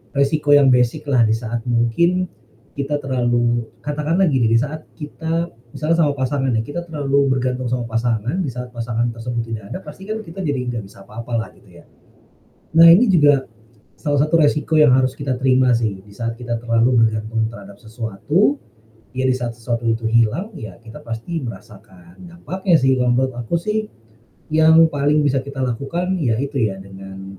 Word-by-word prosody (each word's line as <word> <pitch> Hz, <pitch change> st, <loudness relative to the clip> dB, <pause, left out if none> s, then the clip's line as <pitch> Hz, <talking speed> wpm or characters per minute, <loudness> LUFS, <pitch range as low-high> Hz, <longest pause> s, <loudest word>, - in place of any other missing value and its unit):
resiko 145 Hz, +1 st, +1 dB
yang 145 Hz, -1 st, +6 dB
basic-lah 125 Hz, +1 st, +2 dB
di -, -, +1 dB
saat 115 Hz, 0 st, -4 dB
mungkin, 145 Hz, +11 st, +2 dB, 0.5 s
kita 145 Hz, +1 st, -2 dB
terlalu 120 Hz, -3 st, 0 dB
katakan 150 Hz, +4 st, -2 dB
lah 190 Hz, -, +4 dB
gini 125 Hz, -7 st, +2 dB
di 115 Hz, -, +5 dB
saat 150 Hz, +4 st, -4 dB, 0.2 s
kita 165 Hz, +3 st, -3 dB, 0.2 s
misalnya 155 Hz, +5 st, 0 dB
sama 160 Hz, -3 st, +3 dB
pasangan 135 Hz, -1 st, -1 dB
nih, -, -, -2 dB
kita 170 Hz, +4 st, -4 dB
terlalu 140 Hz, -4 st, 0 dB
bergantung 130 Hz, -1 st, -1 dB
sama 120 Hz, -2 st, -2 dB
pasangan, 115 Hz, +3 st, -1 dB
di 140 Hz, -, -3 dB
saat 125 Hz, +1 st, -6 dB
pasangan 115 Hz, 0 st, -1 dB
tersebut 115 Hz, 0 st, -4 dB
tidak 110 Hz, -2 st, -5 dB
ada -, -, -4 dB
pasti 190 Hz, -, -12 dB
kan 220 Hz, -, -2 dB
kita 190 Hz, -2 st, -8 dB
jadi 145 Hz, -5 st, -1 dB, 0.2 s
nggak 110 Hz, -, -4 dB
bisa 95 Hz, 0 st, -15 dB
apa-apa 115 Hz, +3 st, -9 dB
lah, 105 Hz, -4 st, -5 dB
gitu -, -, -23 dB
ya. -, -, -16 dB, 0.9 s
Nah, 165 Hz, -, +9 dB
ini 210 Hz, +9 st, +6 dB
juga, 145 Hz, -7 st, +4 dB, 0.5 s
salah 145 Hz, -3 st, -1 dB
satu 155 Hz, +2 st, +1 dB
resiko 150 Hz, +1 st, +2 dB
yang 150 Hz, -4 st, +6 dB
harus 130 Hz, 0 st, +1 dB
kita 135 Hz, -2 st, -1 dB
terima 130 Hz, 0 st, +3 dB
sih, 110 Hz, -4 st, -1 dB
di 100 Hz, +2 st, -18 dB
saat 115 Hz, 0 st, -3 dB
kita 120 Hz, -1 st, -3 dB
terlalu 115 Hz, +1 st, +3 dB
bergantung 110 Hz, +1 st, -2 dB
terhadap 100 Hz, -3 st, -12 dB
sesuatu, 120 Hz, -, -1 dB, 0.5 s
ya 130 Hz, +1 st, -1 dB
di -, -, +3 dB
saat 120 Hz, -2 st, -3 dB
sesuatu 115 Hz, 0 st, -3 dB
itu 115 Hz, 0 st, 0 dB
hilang, 120 Hz, -, +1 dB
ya 110 Hz, -, -9 dB
kita 115 Hz, 0 st, -12 dB
pasti 115 Hz, +9 st, -4 dB
merasakan 95 Hz, -6 st, -11 dB
dampaknya 175 Hz, +1 st, 0 dB
sih, 130 Hz, 0 st, +3 dB
kalau 125 Hz, -1 st, +2 dB
menurut 130 Hz, +1 st, 0 dB
aku 120 Hz, +8 st, -1 dB
sih, 215 Hz, +5 st, -2 dB, 0.6 s
yang 160 Hz, +1 st, +6 dB
paling 145 Hz, +1 st, +2 dB
bisa 135 Hz, -1 st, +2 dB
kita 140 Hz, -1 st, -5 dB
lakukan 170 Hz, +10 st, -2 dB
yaitu 135 Hz, +3 st, -1 dB
ya 95 Hz, -, -8 dB
dengan, 95 Hz, 0 st, -10 dB
130 Hz, 180 wpm, -20 LUFS, 115-150 Hz, 0.9 s, Nah